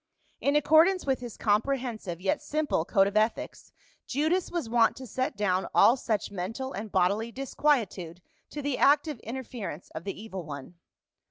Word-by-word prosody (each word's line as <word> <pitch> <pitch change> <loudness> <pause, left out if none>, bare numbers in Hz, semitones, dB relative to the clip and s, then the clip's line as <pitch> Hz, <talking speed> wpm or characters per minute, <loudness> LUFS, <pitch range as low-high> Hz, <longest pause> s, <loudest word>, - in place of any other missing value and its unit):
In 280 +1 +1
accordance 320 +5 +5
with 265 -2 +1
his 240 -3 -8
comprehensive 220 -4 -1
yet 190 +1 0
simple 300 - -1
code 195 +1 +4
of 200 +1 -3
ethics 215 +2 -1 0.4
Judas 315 +7 0
was 340 -9 -3
wont 230 0 +3
to 260 - -8
set 255 +2 -3
down 190 -2 +1
all 235 - +7
such 220 -6 -2
mental 225 +8 -4
and 210 +1 -6
bodily 200 +5 +1
disquietude 230 - -1 0.3
to 295 - -6
the 285 -2 -1
active 290 -1 +3
interference 230 - -7
of 160 - -7
the 195 0 -5
evil 195 -4 -6
one. 145 0 -8
230 Hz, 160 wpm, -28 LUFS, 195-275 Hz, 0.4 s, all